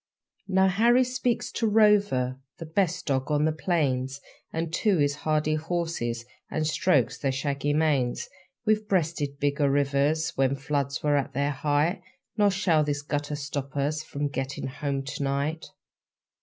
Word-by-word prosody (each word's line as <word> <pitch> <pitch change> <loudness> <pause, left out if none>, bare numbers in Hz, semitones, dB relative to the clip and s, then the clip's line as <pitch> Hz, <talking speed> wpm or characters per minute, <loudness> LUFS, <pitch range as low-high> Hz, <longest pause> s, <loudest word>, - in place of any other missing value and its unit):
Now 190 0 +4
Harry 235 +7 +4
speaks 250 -1 -1
to 230 - 0
Rover, 205 - +3 0.2
The 165 - -7
best 180 +2 0
dog 135 -1 0
on 150 0 +2
the 160 - +2
plains, 140 -5 -1 0.3
And 165 0 -3
to 205 0 +2
his 145 -1 +1
hardy 155 0 0
horses, 155 -8 -2 0.2
And 155 - -1
strokes 155 -4 +2
their 135 - 0
shaggy 140 +1 -1
manes; 145 -5 +1 0.4
'We've 215 0 +2
breasted 160 -7 0
bigger 145 0 +1
rivers 145 +3 +1
When 135 0 +2
floods 140 0 -2
were 145 -1 +3
at 140 - -2
their 140 +2 0
height 150 +5 0 0.3
Nor 205 -1 +4
shall 185 -5 +2
this 145 -1 -2
gutter 145 0 -2
stop 140 -1 -5
us 150 +2 0
From 145 -2 -3
getting 135 0 -4
home 140 0 -3
to 135 +1 -6
night!' 140 +4 -1
150 Hz, 155 wpm, -27 LUFS, 140-170 Hz, 0.4 s, Now